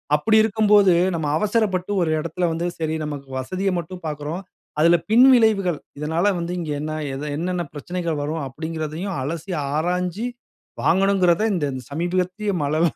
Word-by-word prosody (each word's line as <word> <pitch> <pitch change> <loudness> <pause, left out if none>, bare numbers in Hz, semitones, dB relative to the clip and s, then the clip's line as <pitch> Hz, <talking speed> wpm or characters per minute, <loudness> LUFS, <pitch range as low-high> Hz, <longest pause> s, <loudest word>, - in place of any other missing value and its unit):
அப்படி 220 +9 +3
இருக்கும்போது 210 -3 +4 0.2
நம்ம 160 -2 -2
அவசரப்பட்டு, 205 -2 0
ஒரு 165 -2 +1
இடத்துல 170 +3 -1
வந்து 165 +2 -2
சரி 160 -1 -1
நமக்கு 145 -2 -6
வசதிய 185 +9 -2
மட்டும் 180 +2 -8
பார்க்குறோம். 150 +4 -4 0.4
அதுல 170 +2 +6
பின்விளைவுகள் 220 - +5 0.2
இதனால 160 +4 0
வந்து 170 +1 -3
இங்கு 160 -3 -4
என்ன 155 +1 -3 0.2
எத 135 - -5
என்னன்ன 175 +1 -2
பிரச்சனைகள் 170 +1 -3
வரும்? 155 +1 -3
அப்படீன்ங்கிறதையும் 160 +6 -4
அலசி, 165 +5 -4 0.2
ஆராய்ஞ்சு 180 +6 -1 0.6
வாங்கணும்கிறத 190 -1 +3
இந்த 170 -6 0 0.2
சமீபத்திய 180 +6 -1
மழைல்லா 155 +3 +1
175 Hz, 135 wpm, -22 LUFS, 155-195 Hz, 0.6 s, அதுல